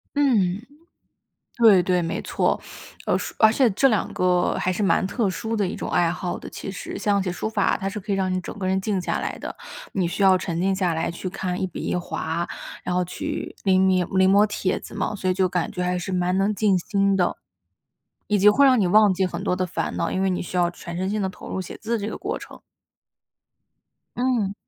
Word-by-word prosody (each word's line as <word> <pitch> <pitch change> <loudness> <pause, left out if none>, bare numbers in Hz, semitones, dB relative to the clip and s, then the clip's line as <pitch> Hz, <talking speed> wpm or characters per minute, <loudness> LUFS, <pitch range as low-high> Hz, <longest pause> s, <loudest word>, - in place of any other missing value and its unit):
嗯。 220 -7 +2 0.9
对 220 -6 +7
对， 180 0 +1
没 165 - -2
错。 - - 0 0.5
呃， - - +2
说 - - -4
而 220 0 +6
且 250 -1 +3
这 215 +8 +3
两 215 -6 +1
个 180 -1 +2
还 185 - 0
是 195 - -2
蛮 190 -1 +2
特 210 -2 0
殊 225 +4 -3
的 200 -3 +1
一 - - -5
种 - - -5
爱 170 -1 +2
好 175 +1 -3
的， - - -9
其 - - -7
实。 190 - -6
像 200 -1 +1
写 185 - -2
书 180 - -3
法， 220 - +1
它 195 - -3
是 210 +2 -5
可 205 +2 -8
以 195 - +2
让 190 -1 0
你 185 - 0
整 205 - -8
个 185 - -3
人 190 +1 +1
静 195 -1 -1
下 - - -2
来 - - -4
的， - - -6 0.4
你 180 -3 0
需 175 - -5
要 190 -1 +6
沉 170 -2 -3
静 190 +1 +2
下 185 -3 0
来 160 - -1
去 185 - -5
看 185 -1 -3
一 - - +1
笔 - - -7
一 - - -1
划， 170 -1 -3 0.3
然 180 - -2
后 180 - +2
去 175 - -5
临 190 -2 +3
迷 185 -1 +3
临 190 +2 +2
摹 205 +1 +6
帖 185 -2 -1
子 - - -11
嘛， 195 +1 -1
所 185 -2 -1
以 - - +1
就 190 -1 +2
感 175 -2 -1
觉 180 - -6
还 180 0 0
是 180 +2 -4
蛮 180 +1 +1
能 195 +2 +2
静 200 -1 +2
心 195 +2 +1
的。 180 -2 +1 0.9
以 210 - +2
及 200 +2 +6
会 275 +7 +5
让 255 -4 +5
你 190 - +3
忘 210 0 +5
记 190 +1 +1
很 180 - -5
多 - - +1
的 185 - 0
烦 180 - -3
恼， - - -1
因 190 - -1
为 195 - +2
你 180 - -1
需 180 - -6
要 175 -1 +3
全 170 0 -8
身 185 +1 -1
心 210 0 -1
地 190 - 0
投 190 - -10
入 190 - -2
写 185 - -7
字 230 +2 -2
这 210 +1 -3
个 - - -5
过 - - -3
程。 - - -12 1.6
嗯。 240 -6 0
190 Hz, 260 characters per minute, -23 LUFS, 180-205 Hz, 1.6 s, 对